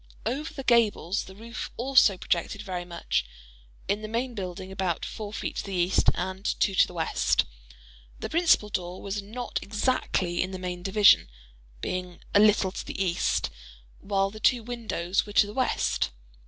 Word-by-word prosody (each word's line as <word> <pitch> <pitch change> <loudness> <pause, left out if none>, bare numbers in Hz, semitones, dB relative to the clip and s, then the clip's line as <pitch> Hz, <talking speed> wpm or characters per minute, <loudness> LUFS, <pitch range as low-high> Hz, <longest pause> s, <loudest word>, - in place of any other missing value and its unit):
Over 295 +5 -2
the 270 - -7
gables 220 -6 +2
the 190 - -12
roofs 230 +3 -6
also 245 -6 +5
projected 180 +4 -1
very 180 -3 -4
much:—in - - -4
the 215 - -5
main 240 +3 -2
building 190 -2 -6
about 185 -3 -1
four 210 -2 -6
feet - - -4
to - - -2
the 195 -1 -4
east 175 +1 +3
and 190 +1 -4 0.2
two 195 - +2
to - - +5
the - - -11
west. 165 - +1 0.7
The - - -3
principal 325 -10 +3
door 180 -2 -3
was 200 +1 -3
not 235 +5 -4
exactly 200 -5 0
in 185 - -1
the 190 - -5
main 180 -1 -5
division, 200 - +5 0.5
being 180 -1 -4
a 205 - +6
little 205 -2 +5
to - - -5
the - - -7
east—while 65 - -2
the 215 - -10
two 240 +2 +3
windows 215 -6 -1
were 205 - -8
to 210 - +6
the 205 - -8
west. 255 - +1
195 Hz, 170 wpm, -27 LUFS, 180-215 Hz, 0.7 s, a